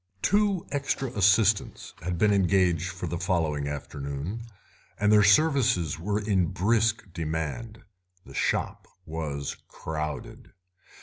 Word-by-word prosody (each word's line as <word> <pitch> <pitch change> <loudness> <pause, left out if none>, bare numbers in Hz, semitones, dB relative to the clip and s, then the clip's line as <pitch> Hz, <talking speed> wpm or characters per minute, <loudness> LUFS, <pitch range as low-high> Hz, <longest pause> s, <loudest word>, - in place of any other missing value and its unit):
Two 200 -3 +2
extra 135 -2 -1
assistants 105 -1 +2
had 90 0 -3
been 105 +4 +4
engaged 90 -3 +2
for - - -6
the 85 - -3
following 80 -6 0
afternoon, 70 +7 -5 0.6
and 105 0 +3
their 105 -1 +7
services 110 - +3
were 100 +5 -1
in 100 -4 +1
brisk 105 0 0
demand; 80 +8 -4 0.4
the 70 - -12
shop - - -1 0.2
was 75 -3 -4
crowded. 75 -1 -6
95 Hz, 115 wpm, -27 LUFS, 80-110 Hz, 0.6 s, their